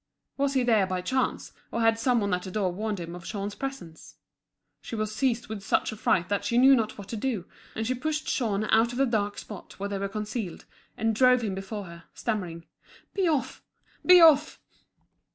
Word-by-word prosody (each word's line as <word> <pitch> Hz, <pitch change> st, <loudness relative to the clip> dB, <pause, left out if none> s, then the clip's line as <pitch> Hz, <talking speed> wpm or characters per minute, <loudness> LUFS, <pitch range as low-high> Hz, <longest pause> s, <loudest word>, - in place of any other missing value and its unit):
Was 280 Hz, 0 st, 0 dB
he 260 Hz, -, +3 dB
there 220 Hz, -5 st, +3 dB
by 185 Hz, -1 st, -2 dB
chance, 260 Hz, +6 st, -1 dB, 0.2 s
or 235 Hz, -, -1 dB
had 225 Hz, 0 st, +3 dB
some 240 Hz, 0 st, +2 dB
one 200 Hz, -2 st, 0 dB
at 180 Hz, -, 0 dB
the 185 Hz, -, -7 dB
door 190 Hz, -1 st, 0 dB
warned 210 Hz, +2 st, -3 dB
him 170 Hz, 0 st, -6 dB
of 175 Hz, 0 st, -9 dB
Jean's 200 Hz, +1 st, -4 dB
presence? 235 Hz, -13 st, -7 dB, 0.7 s
She -, -, -6 dB
was 215 Hz, -1 st, -2 dB
seized 245 Hz, -1 st, 0 dB
with 215 Hz, -2 st, -6 dB
such 195 Hz, -, 0 dB
a -, -, -6 dB
fright 175 Hz, -4 st, +1 dB
that 205 Hz, 0 st, -1 dB
she 235 Hz, +4 st, 0 dB
knew 265 Hz, +2 st, +7 dB
not 220 Hz, -3 st, -1 dB
what 200 Hz, -2 st, -9 dB
to -, -, -4 dB
do; 220 Hz, -5 st, -2 dB, 0.3 s
and 220 Hz, -, -2 dB
she 255 Hz, -, 0 dB
pushed 305 Hz, +4 st, -2 dB
Jean 215 Hz, -5 st, 0 dB
out 230 Hz, +2 st, +4 dB
of -, -, -5 dB
the 275 Hz, -, +3 dB
dark 205 Hz, -4 st, -1 dB
spot 210 Hz, -4 st, -9 dB
where 200 Hz, +1 st, -3 dB
they 200 Hz, -1 st, -3 dB
were 200 Hz, 0 st, -2 dB
concealed, 210 Hz, -2 st, -5 dB, 0.3 s
and 225 Hz, 0 st, +1 dB
drove 250 Hz, +2 st, +4 dB
him 205 Hz, -3 st, -1 dB
before 195 Hz, +2 st, -5 dB
her, 170 Hz, -2 st, -12 dB
stammering 180 Hz, -8 st, -3 dB
out: -, -, -28 dB
"Be 385 Hz, -3 st, +1 dB
off! 300 Hz, -5 st, -1 dB, 0.4 s
Be 360 Hz, 0 st, +8 dB
off!" 310 Hz, -2 st, +6 dB
220 Hz, 215 wpm, -27 LUFS, 195-250 Hz, 0.7 s, Be